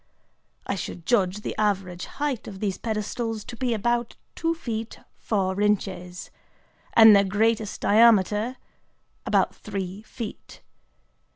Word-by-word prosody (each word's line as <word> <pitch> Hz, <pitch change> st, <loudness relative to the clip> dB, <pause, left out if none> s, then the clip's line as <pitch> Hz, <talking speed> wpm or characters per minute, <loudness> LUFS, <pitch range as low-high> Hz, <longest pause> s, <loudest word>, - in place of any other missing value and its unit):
I -, -, -1 dB
should 175 Hz, -2 st, -6 dB
judge 200 Hz, -4 st, +1 dB
the -, -, -4 dB
average 190 Hz, -4 st, -1 dB
height 285 Hz, -5 st, -2 dB
of 195 Hz, -2 st, -8 dB
these 195 Hz, -2 st, -2 dB
pedestals 220 Hz, 0 st, -3 dB
to 240 Hz, -, -8 dB
be 250 Hz, 0 st, -1 dB
about 235 Hz, +2 st, -1 dB, 0.2 s
two 330 Hz, 0 st, -1 dB
feet 230 Hz, -7 st, -5 dB, 0.2 s
four 195 Hz, -2 st, -1 dB
inches, 190 Hz, -3 st, -1 dB, 0.6 s
and 220 Hz, -2 st, +9 dB
their 200 Hz, -, +5 dB
greatest 215 Hz, +2 st, 0 dB
diameter 215 Hz, +2 st, +4 dB, 0.7 s
about -, -, +2 dB
three 190 Hz, 0 st, -6 dB
feet. 220 Hz, 0 st, -9 dB
210 Hz, 120 wpm, -25 LUFS, 195-230 Hz, 0.7 s, and